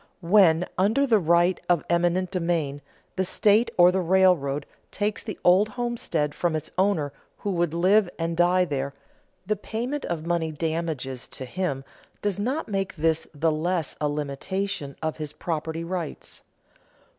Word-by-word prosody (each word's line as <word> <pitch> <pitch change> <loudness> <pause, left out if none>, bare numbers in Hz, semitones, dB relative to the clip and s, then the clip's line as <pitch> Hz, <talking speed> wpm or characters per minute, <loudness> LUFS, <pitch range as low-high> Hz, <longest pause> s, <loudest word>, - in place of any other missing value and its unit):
When, 175 -2 +5
under 220 +9 +3
the 225 -5 +4
right 170 +1 +3
of 175 -3 +2
eminent 175 +2 +1
domain, 165 -6 -1 0.4
the 190 - +2
state 210 +4 +3
or 175 0 +7
the 190 +1 0
railroad 170 -6 +3 0.2
takes 205 0 -2
the 215 -5 -6
old 190 +4 +5
homestead 225 - -2
from 170 -2 0
its 155 0 -4
owner 180 -7 +1 0.2
who 205 - -3
would 170 -3 0
live 190 +3 +4
and 165 0 -2
die 180 +2 +4
there, 140 -3 -3 0.5
the 215 +3 +1
payment 240 +8 -4
of 165 -2 -3
money 170 -2 0
damages 155 -5 -3
to 130 - -8
him 140 -2 -3 0.4
does 205 -2 -1
not 260 +10 -1
make 195 -2 -2
this 160 0 0
the 160 +2 +2
less 165 0 -1
a 150 - +1
limitation 145 +2 -3
of 160 0 -2
his 150 -2 -6
property 160 0 -3
rights. 170 -2 -5
175 Hz, 155 wpm, -25 LUFS, 155-195 Hz, 0.5 s, or